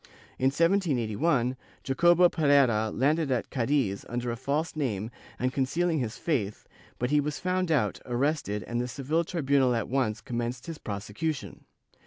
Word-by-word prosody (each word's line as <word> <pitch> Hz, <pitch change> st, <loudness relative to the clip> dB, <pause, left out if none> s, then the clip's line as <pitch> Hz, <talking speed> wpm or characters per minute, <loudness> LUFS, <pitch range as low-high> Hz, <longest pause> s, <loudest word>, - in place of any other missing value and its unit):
In 130 Hz, -, 0 dB
1781, 140 Hz, -, +1 dB, 0.3 s
Jacobo 175 Hz, +6 st, +5 dB
Pereira 140 Hz, -9 st, +3 dB
landed 145 Hz, +7 st, +1 dB
at 125 Hz, -3 st, -1 dB
Cadiz 125 Hz, -6 st, 0 dB
under 120 Hz, 0 st, -2 dB
a -, -, -3 dB
false 150 Hz, +7 st, -2 dB
name 115 Hz, -7 st, -2 dB, 0.3 s
and 130 Hz, +1 st, -1 dB
concealing 160 Hz, +5 st, +1 dB
his 115 Hz, -4 st, -3 dB
faith, 110 Hz, -, -2 dB, 0.3 s
but 125 Hz, +2 st, -1 dB
he 150 Hz, 0 st, +4 dB
was 145 Hz, 0 st, -3 dB
found 185 Hz, -1 st, -1 dB
out, 150 Hz, -5 st, +1 dB
arrested 120 Hz, -4 st, -1 dB
and 120 Hz, +1 st, -2 dB
the 125 Hz, -, -2 dB
Seville 145 Hz, +6 st, -1 dB
tribunal 140 Hz, -7 st, +2 dB
at 115 Hz, -, -1 dB
once 125 Hz, -5 st, 0 dB
commenced 120 Hz, +1 st, -4 dB
his 165 Hz, -2 st, -7 dB
prosecution. 110 Hz, +9 st, -4 dB
135 Hz, 150 wpm, -28 LUFS, 120-155 Hz, 0.3 s, Jacobo